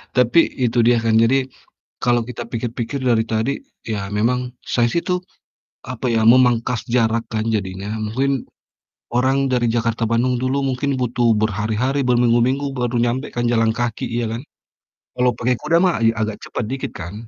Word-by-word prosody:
tapi 125 +6 +4 0.2
itu 120 0 0
dia 120 0 +5
kan, 115 - +2
jadi 115 +4 +4 0.7
kalau 120 -1 +3
kita 125 -1 -6
pikir-pikir 120 +2 -3
dari 115 -2 +3
tadi 110 +5 +1 0.3
ya 100 -3 -3
memang 125 +4 +2 0.3
saya 120 -1 +3
sih 170 - 0
tuh, 180 -2 0 0.7
apa 130 0 -6
ya, 110 - +2
memangkas 120 -1 +4
jarak 115 -1 +2
kan 110 -1 0
jadinya. 95 0 -4 0.2
Mungkin 135 +4 -1 0.7
orang 130 +2 +2
dari 120 -1 +2
Jakarta-Bandung 115 +1 0
dulu 130 +2 0
mungkin 135 +2 -1
butuh 120 -1 +2
berhari-hari, 110 +6 0
berminggu-minggu 125 +3 +2
baru 125 0 -1
nyampai 120 +4 -1
kan 120 0 0
jalan 115 -1 +2
kaki, 120 -1 -2
ya 120 - -1
kan? 115 +2 -4 0.7
Kalau 125 0 +3
pakai 125 +1 0
kuda 165 - +1
mah 180 -2 +3
ya 115 - +4
agak 110 -1 -2
cepat - - -4
dikit 135 0 -4
kan? 105 +7 -8
120 Hz, 160 wpm, -20 LUFS, 115-125 Hz, 0.7 s, dia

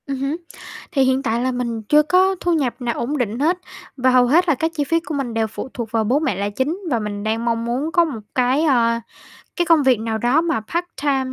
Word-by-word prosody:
Ừm 275 -1 -3
hứm. 275 +4 -2 0.5
Thì 270 - +3
hiện 260 +1 +1
tại 230 -1 0
là 260 +1 0
mình 240 -2 -3
chưa 300 +8 +4
có 370 +5 +3
thu 350 - 0
nhập 270 -6 -1
nào 240 -1 -1
ổn 285 +5 -2
định 235 -2 -2
hết, 330 +5 +2 0.4
và 260 0 +3
hầu 250 -1 +5
hết 340 +8 +3
là 310 - +4
các 320 +5 -1
chi 295 - 0
phí 330 +4 +1
của 330 -1 -7
mình 270 -5 -3
đều 225 -1 0
phụ 225 +4 -7
thuộc 230 -3 -5
vào 225 -1 +1
bố 250 +7 +2
mẹ 310 -10 -1
là 200 +2 -2
chính 265 - -2
và 240 -5 +1
mình 205 -1 -4
đang 225 +2 -1
mong 230 -1 0
muốn 260 +7 -2
có 345 0 +4
một 275 -9 -5 0.2
cái, 255 +4 +2
ơ, 235 -6 +3 0.6
cái 350 - +2
công 325 -2 +5
việc 255 -5 +3
nào 220 0 -2
đó 245 +7 +3
mà 330 -7 0
part-time 285 -6 -2
260 Hz, 255 wpm, -20 LUFS, 230-305 Hz, 0.6 s, hầu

